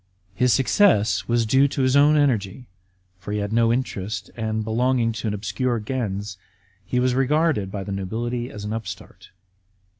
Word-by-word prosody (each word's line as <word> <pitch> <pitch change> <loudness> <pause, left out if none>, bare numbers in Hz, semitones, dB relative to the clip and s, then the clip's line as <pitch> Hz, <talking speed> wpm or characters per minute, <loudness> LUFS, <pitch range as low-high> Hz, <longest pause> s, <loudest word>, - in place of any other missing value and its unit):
His 125 +6 +2
success 115 - +3
was 120 -1 +1
due 135 +5 +4
to 140 -1 -2
his 130 +1 +2
own 145 +2 +5
energy, 125 -5 0 0.5
for 90 +3 -7
he 105 - -1
had 105 +1 -3
no 115 0 +3
interest, 115 -4 -3
and, 110 -1 -2
belonging 120 +1 +1
to 110 0 -5
an 105 - -1
obscure 120 +4 -2
gens, 105 -4 -4 0.4
he 125 +7 -1
was 125 0 +2
regarded 135 - +1
by 100 -1 -4
the 100 - -7
nobility 120 +6 -3
as 105 -4 -8
an 105 - -3
upstart. 115 0 -8
115 Hz, 170 wpm, -23 LUFS, 105-130 Hz, 0.5 s, own